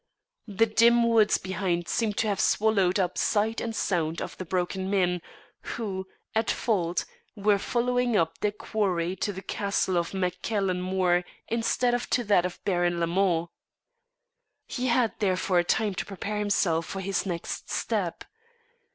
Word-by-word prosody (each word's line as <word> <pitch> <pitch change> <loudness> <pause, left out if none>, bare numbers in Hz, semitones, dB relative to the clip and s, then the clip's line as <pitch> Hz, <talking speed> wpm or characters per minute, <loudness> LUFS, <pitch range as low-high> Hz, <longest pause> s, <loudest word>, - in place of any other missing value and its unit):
The 215 +2 +3
dim 235 +2 +4
woods 225 -2 +4
behind 185 -2 -2
seemed 215 -3 0
to 225 - +1
have 200 -2 0
swallowed 200 -3 +3
up 180 -2 0
sight 220 +2 +1
and 225 -1 -3
sound 165 -6 0
of - - -5
the 185 - -4
broken 185 +2 -2
men, 180 -3 +1 0.6
who, 190 -5 -4 0.3
at 220 0 +1
fault, 180 -7 0 0.3
were 205 -1 +2
following 245 +1 +1
up 165 -2 0
their 210 - +1
quarry 190 -4 -1
to 205 - -1
the 190 0 -8
castle 200 -3 0
of 170 - -3
Mac 180 -2 -2
Cailen 195 -5 0
Mor 180 -1 +1 0.3
instead 235 +2 +1
of 245 0 -1
to 245 - +1
that 200 -5 +3
of 180 - -11
Baron 175 -3 +1
Lamond. 170 0 +1 1.2
He 255 0 -3
had 235 -2 +2
therefore 185 -3 +2
time 205 +4 +1
to - - -3
prepare 205 +1 -4
himself 175 -5 +1
for 195 - -5
his 195 +1 -1
next 170 -2 -4
step. 190 -7 -2
195 Hz, 155 wpm, -27 LUFS, 180-220 Hz, 1.2 s, dim